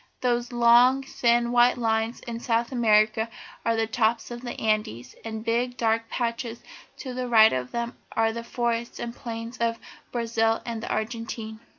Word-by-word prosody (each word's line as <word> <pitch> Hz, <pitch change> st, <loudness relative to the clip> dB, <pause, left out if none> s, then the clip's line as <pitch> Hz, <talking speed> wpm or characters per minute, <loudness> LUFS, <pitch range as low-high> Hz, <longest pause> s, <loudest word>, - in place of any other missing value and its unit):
"Those 240 Hz, -1 st, 0 dB
long 240 Hz, +3 st, +5 dB
thin 235 Hz, -2 st, +1 dB
white 245 Hz, +1 st, +4 dB
lines 225 Hz, 0 st, 0 dB
in 230 Hz, -1 st, -6 dB
South 235 Hz, 0 st, 0 dB
America 220 Hz, -1 st, +3 dB, 0.3 s
are 230 Hz, -, +1 dB
the 225 Hz, 0 st, +1 dB
tops 225 Hz, +1 st, 0 dB
of 240 Hz, 0 st, -6 dB
the 245 Hz, -1 st, -6 dB
Andes, 210 Hz, -, -1 dB
and 220 Hz, -1 st, -5 dB
the -, -, -10 dB
big, 240 Hz, +2 st, 0 dB
dark 225 Hz, 0 st, 0 dB
patches 235 Hz, -1 st, -3 dB, 0.3 s
to 260 Hz, -3 st, -6 dB
the 250 Hz, 0 st, -3 dB
right 220 Hz, -2 st, +6 dB
of 125 Hz, -1 st, -2 dB
them 235 Hz, 0 st, -3 dB, 0.2 s
are 225 Hz, 0 st, +2 dB
the 230 Hz, 0 st, -5 dB
forests 235 Hz, 0 st, -2 dB
and 235 Hz, 0 st, -5 dB
plains 230 Hz, 0 st, -7 dB
of 230 Hz, 0 st, 0 dB, 0.3 s
Brazil 225 Hz, -1 st, +1 dB
and 230 Hz, -2 st, -4 dB
the -, -, -5 dB
Argentine. 220 Hz, 0 st, -4 dB
230 Hz, 175 wpm, -26 LUFS, 225-240 Hz, 0.3 s, right